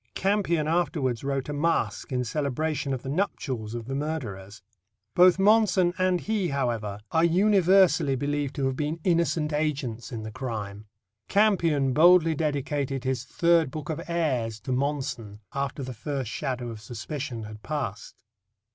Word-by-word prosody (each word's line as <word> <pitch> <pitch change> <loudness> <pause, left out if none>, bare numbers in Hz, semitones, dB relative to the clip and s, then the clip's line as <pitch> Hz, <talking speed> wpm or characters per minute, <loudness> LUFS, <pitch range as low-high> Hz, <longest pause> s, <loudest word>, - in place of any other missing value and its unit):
Campion 185 -6 +1
afterwards 155 -8 0
wrote 135 -1 -2
a 150 - -3
masque 160 0 0
in 125 -1 0
celebration 145 +2 -2
of 130 -2 -3
the - - -7
nuptials 130 - -2
of 115 -1 -5
the 135 - -5
murderers. 110 -10 -5 0.5
Both 180 +1 +6
Monson 195 -3 +4
and 185 -1 +2
he, 210 -4 0
however, 115 -8 -2
are 160 - +3
universally 185 -4 +4
believed 145 +1 -2
to 135 - -1
have 135 -1 0
been 150 +4 -2
innocent 165 -3 +1
agents 140 -6 -2
in 115 -3 -5
the 110 - -6
crime. 110 -4 -5 0.4
Campion 170 -10 +3
boldly 165 +2 +6
dedicated 145 -3 -2
his 130 -2 -2
Third 170 -2 +3
Book 155 +3 -5
of 160 +1 -4
Airs 130 -10 -1
to 130 - -5
Monson 130 -6 -2
after 140 0 -3
the 130 0 -5
first 130 0 -4
shadow 125 -4 -3
of 110 -2 -8
suspicion 120 +2 -5
had 105 0 -9
passed. 125 -9 -5
140 Hz, 150 wpm, -26 LUFS, 125-165 Hz, 0.5 s, Both